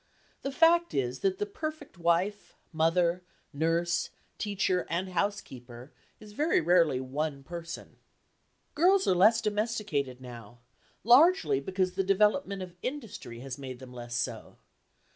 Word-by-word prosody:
The 275 - -3
fact 340 +3 +4
is 130 -1 -1
that 190 -1 0
the 205 - -1
perfect 310 +6 -6
wife, 175 +5 0 0.2
mother, 170 +2 +2 0.3
nurse, 165 +3 0 0.3
teacher 195 -3 0
and 180 +3 -2
housekeeper 130 -10 -4 0.3
is 210 -1 -13
very 300 +9 +2
rarely 165 -5 +3
one 140 +2 -3
person. 170 +2 -8 0.8
Girls 375 +5 +4
are - - +5
less 215 +5 +5
domesticated 210 - -2
now, 120 -3 -11 0.5
largely 285 - +5
because 185 +5 -1
the 195 - 0
development 200 +1 +2
of 180 -1 -10
industry 225 - -6
has 135 0 -7
made 130 -2 -7
them 125 0 -12
less 120 -1 -7
so. 120 - -4
180 Hz, 130 wpm, -29 LUFS, 140-210 Hz, 0.8 s, are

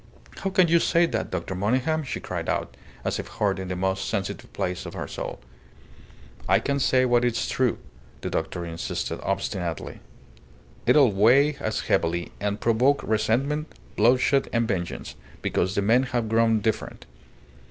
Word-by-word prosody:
"How 195 - -2
can 185 -2 +4
you 170 +1 +4
say 170 +1 +3
that, 115 -9 -2
Dr. - - -3
Monygham?" 125 - +1
she 135 - -4
cried - - -4
out, - - -2 0.3
as - - -1
if - - -5
hurt 100 -3 -1
in 95 - -5
the 90 - -3
most 95 +1 -1
sensitive 100 -3 -3
place 90 -1 -3
of - - -8
her - - -4
soul. - - -6 1.1
"I - - +6
can 140 0 -1
say 130 -1 +3
what 120 -1 +3
is 120 -2 0
true," 130 -3 +1 0.4
the - - -4
doctor 85 - -2
insisted, 85 0 -4
obstinately. 85 -3 -3 0.9
"It'll 140 -7 +6
weigh 125 +9 +4
as 110 - -2
heavily, 85 +1 0
and 105 0 -2
provoke 125 +5 +2
resentment, 125 +8 0 0.2
bloodshed, 125 +4 +3
and 115 -1 +1
vengeance, 90 -5 -3 0.3
because 95 +2 0
the 100 - +1
men 115 +5 +4 0.2
have 115 -2 -1
grown 115 -1 +3
different. 110 +1 -2
115 Hz, 160 wpm, -25 LUFS, 95-130 Hz, 1.1 s, I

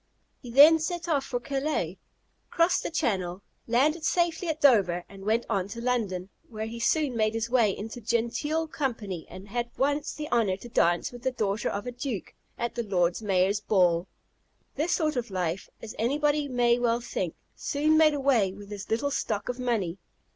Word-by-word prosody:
He 245 - -9
then 295 +6 +8
set 345 +1 -3
off 285 -5 +1
for 245 - -2
Calais, 270 - -2 0.5
crossed 335 +1 +2
the - - -3
Channel, 195 - -1 0.2
landed 295 +8 +2
safely 345 +1 +1
at 315 -1 -1
Dover, 195 - +4
and 195 -1 -12
went 225 +3 +1
on 195 -4 0
to 230 +3 -7
London, 215 -7 -1 0.2
where 220 -1 -4
he 230 +1 -6
soon 280 +2 +1
made 215 -1 +1
his 225 +1 -2
way 230 -6 +3
into 225 +4 -7
genteel 235 +8 0
company, 225 - -4
and 190 +2 -11
had 240 +2 -2
once 285 +2 0
the 300 0 -6
honour 210 -6 +2
to 240 - -11
dance 175 -5 +2
with 245 -1 -10
the 260 - +1
daughter 210 -4 -1
of 200 +1 -4
a 245 - -3
Duke 245 -4 -5 0.2
at 235 - -2
the 240 - -2
Lord 180 -3 0
Mayor's 195 0 +2
ball. 180 -4 +2 0.7
This 310 +5 -1
sort 310 -4 +1
of 240 -2 -2
life, 185 -1 -2
as 220 - -7
anybody 290 +5 +1
may 245 -2 +2
well 235 -1 +2
think, 185 -8 -3 0.2
soon 305 +2 +1
made 310 -1 +5
away 255 -9 +2
with 200 +1 -12
his 205 -1 -7
little 235 +6 0
stock 210 -6 -2
of 250 0 -3
money. 210 -8 -1
235 Hz, 185 wpm, -27 LUFS, 200-280 Hz, 0.7 s, then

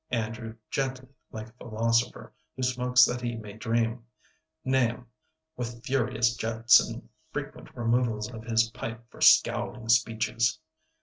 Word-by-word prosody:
Andrew 115 -1 -3 0.2
gently, 130 -1 -2 0.2
like 110 0 -7
a - - -21
philosopher, 115 +1 -1 0.2
who 130 - -4
smokes 125 0 +4
that 125 0 -3
he 120 -1 -3
may 105 -2 -8
dream; 115 +1 -1 0.6
Nahum 125 -2 +1 0.5
with 120 -1 -6
furious 120 -3 +1
jets 115 +1 +5
and - - -5 0.2
frequent - - -6
removals 115 -2 0
of 115 -1 -9
his 115 -1 +2
pipe 115 +1 -7
for - - -15
scowling 115 -2 +4
speeches. 115 +1 +2
115 Hz, 130 wpm, -28 LUFS, 115-125 Hz, 0.6 s, jets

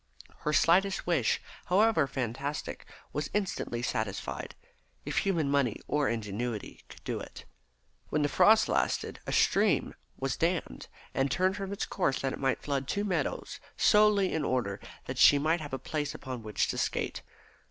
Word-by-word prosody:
Her 150 - -1
slightest 190 +6 +3
wish, 160 -10 +2 0.3
however 195 -5 +3
fantastic, 135 +2 -4 0.3
was 150 0 -2
instantly 180 - -2
satisfied, 110 -4 -3 0.5
if - - 0
human 170 -7 +1
money 140 -6 +1
or 145 -2 +1
ingenuity 110 0 -4
could - - -14
do - - -3
it. - - -10 0.6
When 150 0 +1
the - - +3
frost 215 +8 +5
lasted - - 0
a - - -2
stream 200 -6 +3 0.2
was 135 -2 -1
dammed 165 - -1 0.3
and 135 +1 +1
turned 185 +4 +1
from 195 -1 -5
its 200 - -2
course 135 -9 0
that 135 -1 -1
it - - -6
might 135 -1 0
flood 140 -2 -2
two 205 - -1
meadows, 200 -3 -2 0.2
solely 210 -2 +4
in 160 - 0
order 110 -6 -1 0.3
that 130 0 -5
she 145 - +8
might 160 +3 +1
have 145 - -7
a 135 - -2
place 145 +3 -3
upon 130 -3 -6
which 110 -1 -1
to - - -2
skate. - - -2
145 Hz, 165 wpm, -30 LUFS, 130-185 Hz, 0.6 s, she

